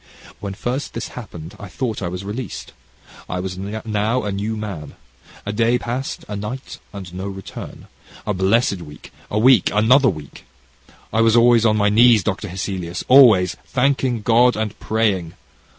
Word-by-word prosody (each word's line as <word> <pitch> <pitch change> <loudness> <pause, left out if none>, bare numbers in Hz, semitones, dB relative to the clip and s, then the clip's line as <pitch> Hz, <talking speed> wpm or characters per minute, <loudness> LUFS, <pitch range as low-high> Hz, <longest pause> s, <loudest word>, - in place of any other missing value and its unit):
"When 100 -1 -6
first 125 +7 -4
this 115 - -4
happened, 85 -8 -9
I 100 - -8
thought 110 +3 -4
I 90 - -2
was 90 +2 -5
released. 110 +1 -6 0.6
I 90 - -2
was 90 0 -4
now 110 +3 -2
a 105 - -2
new 105 +3 -3
man. 95 -9 -6 0.5
A 105 - -3
day 115 +3 +2
passed 125 +3 -4
a 105 - -5
night 105 +6 -6
and 95 -4 -9
no 95 +2 -5
return, 95 -1 -9
and - - -22 0.4
a 105 - 0
blessed 100 +1 +1
week 75 -3 -12 0.2
a 105 - -2
week 120 -2 +5
another 125 +6 +4
week. 75 -6 -8 0.7
I 110 - +3
was 115 0 +4
always 120 -1 +5
on 110 -1 +2
my 105 0 +3
knees, 115 -1 +5
Dr. 105 +2 -2
Hesselius, 90 -1 -4
always, 110 -10 +6
thanking 130 -3 0
God 120 +2 +4
and 110 -1 -2
praying. 100 -7 0
105 Hz, 165 wpm, -20 LUFS, 95-120 Hz, 0.7 s, always